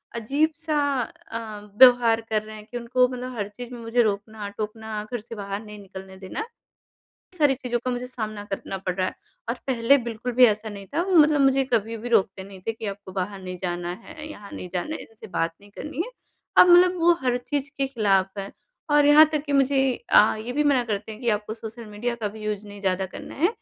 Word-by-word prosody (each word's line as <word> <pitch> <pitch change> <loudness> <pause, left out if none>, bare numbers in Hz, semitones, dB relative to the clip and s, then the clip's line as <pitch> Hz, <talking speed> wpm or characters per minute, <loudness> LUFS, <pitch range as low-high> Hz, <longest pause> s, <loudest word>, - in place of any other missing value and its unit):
अजीब-सा 300 +6 0 0.2
अ, 225 -2 -7 0.2
व्यवहार 245 -3 +7
कर 220 -1 -1
रहे 215 0 -10
हैं 210 0 -11
कि 245 - -3
उनको 250 +1 +2
मतलब 250 0 -6
हर 205 -1 -2
चीज़ 245 +4 -9
में 240 - -7
मुझे 230 +1 +2
रोकना-टोकना 215 +1 -4
घर 240 - -2
से 230 +2 -9
बाहर 200 0 -4
नहीं 210 0 -10
निकलने 190 -1 -10
देना। 190 - -7
इन 460 +1 -8 0.7
सारी 290 -3 +4
चीज़ों 245 -2 -2
का 255 - 0
मुझे 245 0 -3
सामना 215 -4 -5
करना 195 0 -4
पड़ 185 -1 -3
रहा 185 0 0
है - - -4 0.3
और 235 - +1
पहले 255 +1 +4
बिल्कुल 235 +2 -4
भी 250 +1 +7
ऐसा 215 0 0
नहीं 200 -2 -8
था 335 - +2
वो 375 -1 +1
मतलब 300 -2 +6
मुझे 270 0 +4
कभी 225 0 +1
भी 235 +3 -6
रोकते 195 -4 +2
नहीं 195 -1 -12
थे 225 - +1
कि 225 -1 -7
आपको 200 -1 -6
बाहर 190 +1 -3
नहीं 185 0 -6
जाना 175 -1 -2
है 300 -1 -9
यहाँ 205 -7 -10
नहीं 180 - -6
जाना 185 - -2
है - - -6
इनसे 225 0 -13
बात 165 -4 -1
नहीं 205 - -17
करनी 300 +9 -4
है। - - -9 0.5
अब 360 - +9
मतलब 360 +1 +6
वो 340 +1 +6
हर 250 -1 +2
चीज़ 285 -1 -2
के 275 - +1
खिलाफ 200 -6 +1
हैं 195 0 -5 0.4
और 295 0 +5
यहाँ 300 +2 +9
तक 300 -1 -1
कि 290 - -3
मुझे 275 0 +3 0.3
अ, 215 - +6
ये 230 +3 -5
भी 295 +2 +1
मना 265 -4 +3
करते 215 0 -3
हैं 215 - -11
कि 240 - -2
आपको 215 +1 -7
सोशल 225 0 -9
मीडिया 220 +3 -3
का 220 -3 -3
भी 215 +1 -10
यूज़ 210 -1 -3
नहीं 205 0 -10
ज़्यादा 190 -1 0
करना - - -9
है 335 +6 +3
225 Hz, 230 wpm, -25 LUFS, 205-260 Hz, 0.7 s, अब